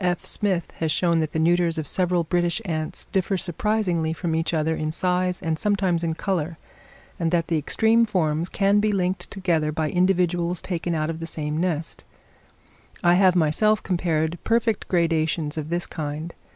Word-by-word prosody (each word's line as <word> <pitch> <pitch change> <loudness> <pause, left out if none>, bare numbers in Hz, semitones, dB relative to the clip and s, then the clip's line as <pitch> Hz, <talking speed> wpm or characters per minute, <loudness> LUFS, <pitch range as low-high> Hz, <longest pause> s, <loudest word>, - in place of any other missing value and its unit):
F. 175 -1 0
Smith 190 -5 -1
has 160 -1 0
shown 170 0 +2
that 155 -1 -1
the - - -3
neuters 170 +1 +2
of 155 - -2
several 180 +2 +1
British 175 +3 0
ants 155 -3 -3
differ 190 0 0
surprisingly 175 -3 0
from 165 0 -3
each 165 +1 0
other 160 0 0
in 155 0 -2
size 180 +1 0
and 160 -2 -1
sometimes 190 -5 +1
in 165 -1 -1
colour; 170 -4 -2 0.6
and 165 -1 +1
that 170 -1 0
the 165 - +2
extreme 225 +9 +3
forms 170 -6 0
can 200 0 +2
be 210 0 +2
linked 185 -1 -1
together 170 -6 0
by 155 0 -1
individuals 180 -1 +1
taken 175 -2 -3
out 155 0 -1
of 160 - -7
the 165 - -5
same 150 -2 -4
nest: 165 -2 -2 1.0
I 175 0 +5
have 185 0 +5
myself 185 +6 +2
compared 170 -2 -1
perfect 230 -2 +1
gradations 165 -2 0
of 155 -1 -4
this 175 +1 -1
kind. 155 +1 -5
170 Hz, 175 wpm, -24 LUFS, 160-185 Hz, 1.0 s, I